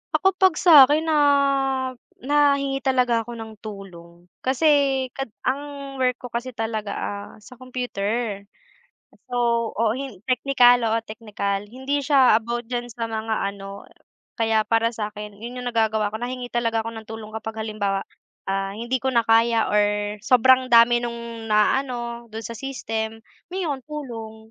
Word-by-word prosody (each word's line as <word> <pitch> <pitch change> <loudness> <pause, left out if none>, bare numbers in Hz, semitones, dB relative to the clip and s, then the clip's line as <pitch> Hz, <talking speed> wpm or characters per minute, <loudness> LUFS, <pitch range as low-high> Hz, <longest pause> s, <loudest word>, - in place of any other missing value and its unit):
Ako, 385 - +4
'pag 375 -4 +5
sa 305 -6 +8
akin 300 +3 +2
na 320 -1 +1 1.1
nahingi 280 -1 +2
talaga 250 -4 +2
ako 240 +1 -8
ng 225 -1 -8
tulong, 175 -5 -11 0.2
kasi 275 -1 +2
kad 270 +2 -5 0.2
ang 280 0 -3
work 250 -1 +2
ko 250 - -8
kasi 240 +1 -4
talaga, 220 -2 -3
ah, 200 0 -5
sa 255 +3 -14
computer. 235 -4 -3 0.9
So, 235 -2 +1
oo, 225 -1 +2
hin 265 -6 -6
technical, 250 -1 +4
oo, 225 - +2
technical, 205 -3 -3
hindi 265 +4 -2
siya 270 -4 +5
about 235 +1 -3
diyan 240 0 -4
sa 230 0 -4
mga 220 0 -2 0.2
ano 200 0 -10 0.5
kaya 220 -1 +1
para 230 0 +2
sa 215 -2 -5
akin, 210 -1 -9
'yun 245 +3 -7
'yung 245 - -2
nagagawa 220 -2 +1
ko, 220 - -5
nahingi 245 +1 -5
talaga 230 -2 0
ako 230 - -5
ng 220 -1 -10
tulong 220 -1 -8
kapag 220 0 -5
halimbawa, 205 -3 -2 0.5
ah, 195 0 -2
hindi 235 +4 -2
ko 260 +1 -2
na 235 - +4
kaya, 230 0 +3
or 210 0 +1
sobrang 255 +3 +4
dami 240 0 +6
nung 235 -1 -6
naano 235 +2 0
do'n 225 - -5
sa 230 -1 -7
system, 225 -5 -4 0.3
humihingi 360 -2 -3
akong 265 -3 -5
tulong. 240 -8 -7
235 Hz, 155 wpm, -23 LUFS, 220-260 Hz, 1.1 s, sa